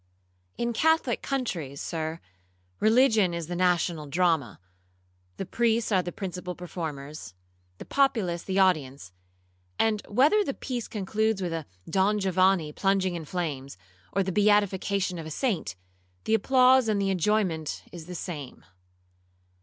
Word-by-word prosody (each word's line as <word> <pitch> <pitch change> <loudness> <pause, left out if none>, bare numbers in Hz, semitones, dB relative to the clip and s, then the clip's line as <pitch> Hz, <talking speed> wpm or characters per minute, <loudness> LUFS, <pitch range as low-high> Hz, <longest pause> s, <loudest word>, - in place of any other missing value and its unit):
'In 235 0 -1
Catholic 320 -2 +2
countries, 170 - -3
Sir, 160 0 -4 0.6
religion 220 -5 +4
is 170 -1 -4
the 175 +3 -5
national 175 -3 +1
drama; 160 - +1 0.8
the 195 - -4
priests 230 +3 +1
are 190 -2 +4
the 175 - -5
principal 180 -1 -5
performers, 155 - -7 0.4
the - - -9
populace 220 -11 +1
the 190 +1 -3
audience; 140 - +1 0.7
and 215 -2 +2
whether 290 - +4
the 275 - -3
piece 245 -4 -4
concludes 215 +1 -1
with 175 -3 -2
a 160 -3 -4 0.2
'Don 195 +4 +2
Giovanni' 185 -4 +2
plunging 195 0 +1
in 170 -2 -5
flames, 145 - -4 0.3
or 195 - +1
the 190 - -2
beatification 200 -2 +2
of 160 - -6
a - - -6
saint, 185 - -2 0.5
the 220 - 0
applause 255 +2 +5
and 210 -2 +1
the 195 -1 +1
enjoyment 185 -4 0
is 170 -2 -9
the 180 - -7
same. 150 -7 -7
185 Hz, 140 wpm, -27 LUFS, 165-215 Hz, 0.8 s, applause